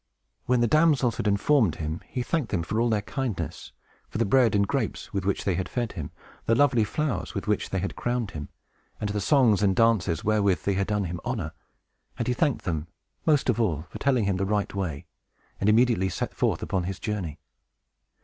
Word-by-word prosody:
When 125 -1 +3
the 120 - +4
damsels 150 -5 +3
had - - -1
informed 105 - +3
him, 80 +1 -4
he 125 - -3
thanked 150 -3 -1
them 90 -5 -1
for 110 +6 -1
all 120 - +2
their 105 -2 +1
kindness, 130 -3 -4 0.4
for - - -5
the - - +2
bread 115 0 +4
and 100 0 +3
grapes - - -2
with 95 -1 -2
which 100 - 0
they 95 - +2
had 90 +2 -2
fed 120 -3 -2
him, 75 - -6 0.4
the 115 - +4
lovely 125 -4 +4
flowers 150 +6 -2
with - - -3
which - - 0
they - - -2
had - - -3
crowned 120 -4 -2
him, 75 -4 -7 0.5
and 105 - -2
the 105 0 -1
songs 120 -4 +4
and 95 -2 +3
dances 110 -8 +2
wherewith 100 -3 +2
they 100 - +1
had 95 0 0
done 105 -2 0
him 85 -1 -4
honor, 110 -11 -3 0.7
and - - -2
he 125 - +2
thanked 140 +1 0
them, 80 -3 -2 0.4
most 150 -3 +3
of 120 -2 +2
all, 80 -8 0
for - - -7
telling 130 -5 +2
him 100 -2 0
the 95 - -1
right 105 0 0
way, 90 -8 -3 0.5
and 100 - +2
immediately 110 -4 +3
set - - -3
forth - - 0
upon 90 -2 -1
his 95 0 -4
journey. 100 -10 -4
105 Hz, 210 wpm, -26 LUFS, 95-120 Hz, 0.7 s, the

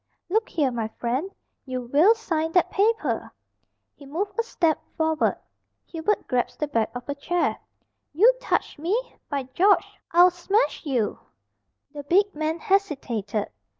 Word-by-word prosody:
"Look 440 +2 +1
here, 285 -6 +1
my 230 -2 -2
friend, 255 +10 -1 0.3
you 255 -2 -4
will 295 - +4
sign 325 -7 -2
that 360 - +3
paper." 440 +3 0 0.6
He 280 - -15
moved 375 +8 -2
a - - +6
step 335 -9 0 0.2
forward. 320 -1 +1 0.5
Hubert 335 +5 -1
grasped 250 -2 -1
the 300 - 0
back 230 -6 0
of 245 0 -7
a 285 - -1
chair. 340 +5 -1 0.5
"You 435 +12 +6
touch - - -1
me! 430 +11 -2
By 280 -2 -1
George! 390 +8 +2
I'll 355 +2 +6
smash 355 +1 0
you!" 245 -7 0 0.7
The 290 - -6
big 390 +8 +2
man 310 +2 -2
hesitated. 270 - -1
320 Hz, 145 wpm, -25 LUFS, 275-395 Hz, 0.7 s, a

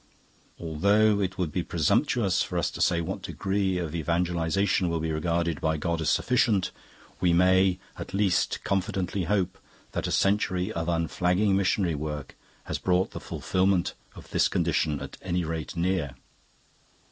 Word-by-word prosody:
Although 100 +6 +3
it 95 -1 -2
would 90 -5 -1
be 90 - -1
presumptuous 100 - +1
for - - -2
us - - 0
to - - -6
say 85 -1 +3
what 80 - -4
degree 95 -1 -1
of 85 -3 -3
evangelisation 85 +3 +1
will 85 -1 -1
be 80 0 -2
regarded 85 0 -1
by 80 0 +1
God 85 +1 -1
as 80 - +1
sufficient, 115 -6 +2 0.5
we 90 -2 +3
may 95 +1 +4 0.2
at - - -6
least 100 -1 +1
confidently 95 -2 -1
hope 95 0 0 0.3
that - - -2
a - - -3
century 95 -1 +1
of 85 -3 -2
unflagging 90 +4 +1
missionary 95 -2 +1
work 75 -2 -5 0.3
has - - -4
brought 90 0 +1
the - - -6
fulfilment 95 -1 0 0.2
of - - -12
this - - +3
condition 75 -3 0
at - - -8
any 90 -1 -1
rate 80 +1 -4
near. 85 -6 0
90 Hz, 155 wpm, -27 LUFS, 80-95 Hz, 0.5 s, may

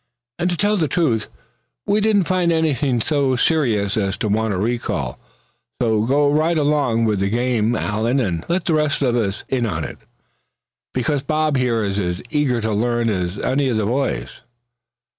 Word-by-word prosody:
And 175 +1 +1
to 175 - -2
tell 210 +2 +2
the 160 -4 +1
truth 135 -8 0 0.6
we 210 - +2
didn't 210 -2 +3
find 180 -1 +1
anything 145 -6 +1
so 140 -1 +1
serious 120 - +1
as 100 -1 0
to 110 - -2
warrant 110 0 0
a - - -2
recall. 115 +5 -2 0.6
So 110 -2 +1
go 145 +2 +3
right 160 +3 +2
along 145 -6 +1
with 105 -3 +1
the 100 0 0
game, 120 0 +1
Allan, 110 +5 0
and 90 -9 -1
let 175 +1 0
the 170 - +1
rest 150 -2 +1
of 125 -3 +2
us 105 -4 -1
in 125 -3 0
on 80 -6 -3
it; - - -7 0.9
because 140 +3 0
Bob 155 +1 0
here 120 -4 +1
is 100 0 -1
as 90 -2 -2
eager 140 -6 +1
to 110 0 -1
learn 120 +2 +1
as 90 -2 -2
any 135 +1 +1
of 115 - 0
the 110 - 0
boys." 130 +5 -1
125 Hz, 180 wpm, -20 LUFS, 110-150 Hz, 0.9 s, didn't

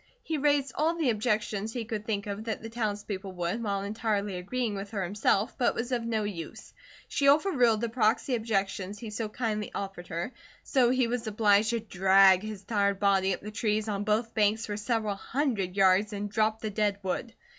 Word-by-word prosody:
He 315 -2 -2
raised 285 -2 +2
all 320 +2 +1
the 310 -7 +2
objections 215 -1 -1
he 240 -3 -3
could 215 -2 -5
think 205 -3 -1
of 205 +1 -5
that 220 -1 -3
the 225 - -7
townspeople 205 -4 -3
would, 180 +5 -2
while 200 -3 -1
entirely 205 -1 -1
agreeing 215 +5 -2
with 200 0 -5
her 200 -3 -2
himself, 200 +4 +1
but 245 - +3
it - - -5
was 240 +3 -3
of 245 -2 +1
no 225 -2 -1
use. 185 -6 -7 0.3
She 280 - +1
over 310 +8 +5
ruled 240 - +3
the 235 - -1
proxy 230 +2 +1
objections 200 -3 -1
he 220 0 -7
so 215 0 -3
kindly 215 -2 -2
offered 195 -3 -5
her, 170 +9 -4 0.3
so 255 -4 +3
he 255 0 +2
was 235 0 -2
obliged 210 0 +3
to 235 0 0
drag 190 -2 +5
his 215 -2 -7
tired 200 -2 +1
body 195 -2 +3
up - - -15
the 210 - -7
trees 215 0 0
on 205 -1 -2
both 215 +2 0
banks 215 +1 +2
for 205 - -4
several 215 0 -1
hundred 205 -4 -2
yards 195 +2 +4
and 205 0 -4
drop 215 +1 +1
the 215 - -3
dead 205 -1 0
wood. 190 +5 -3
215 Hz, 205 wpm, -29 LUFS, 200-230 Hz, 0.3 s, over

